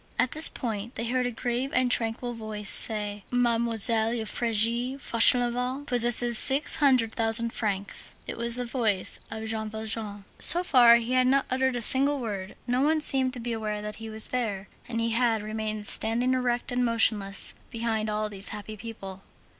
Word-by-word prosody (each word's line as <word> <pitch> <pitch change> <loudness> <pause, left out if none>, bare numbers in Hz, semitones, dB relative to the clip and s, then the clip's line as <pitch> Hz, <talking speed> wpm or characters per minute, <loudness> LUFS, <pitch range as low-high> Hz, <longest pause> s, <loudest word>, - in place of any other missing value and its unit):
64 - - +3
At 255 - -4
this 310 +1 +6
point 225 -1 -7
they 230 - -5
heard 250 +1 -2
a - - -5
grave 245 +3 -4
and 255 -1 0
tranquil 240 +1 -2
voice 215 -2 -4
say: 210 -2 +4
"Mademoiselle 230 -2 -1
Euphrasie 235 +3 -1
Fauchelevent 250 +2 +2
possesses 240 -2 +4
six 275 +2 +4
hundred 255 -7 +1
thousand 230 +1 +1
francs." 200 -3 -4
It - - -7
was 235 0 -1
the 250 0 -5
voice 225 -6 -1
of 220 0 -8
Jean 220 -1 -4
Valjean. 215 -2 -4 0.2
So 350 +1 +6
far 245 -8 +5
he 235 +1 -3
had 255 0 +1
not 275 +1 +1
uttered 260 0 -1
a 240 - -3
single 275 +5 +4
word, 200 -6 -7
no 250 +1 -1
one 310 +2 0
seemed 260 -3 +3
to - - -8
be 235 0 -5
aware 215 -2 -5
that 210 0 -6
he 225 0 -9
was 220 0 -4
there, 210 -6 -4 0.2
and 230 -1 -4
he 230 0 -1
had 225 -2 0
remained 215 0 -5
standing 235 +4 +1
erect 245 -1 -3
and 245 0 -1
motionless, 220 -4 +2 0.2
behind 225 -2 -4
all 215 0 -3
these 200 -1 -2
happy 210 +1 -8
people. 195 -3 -10
230 Hz, 180 wpm, -25 LUFS, 215-250 Hz, 0.2 s, this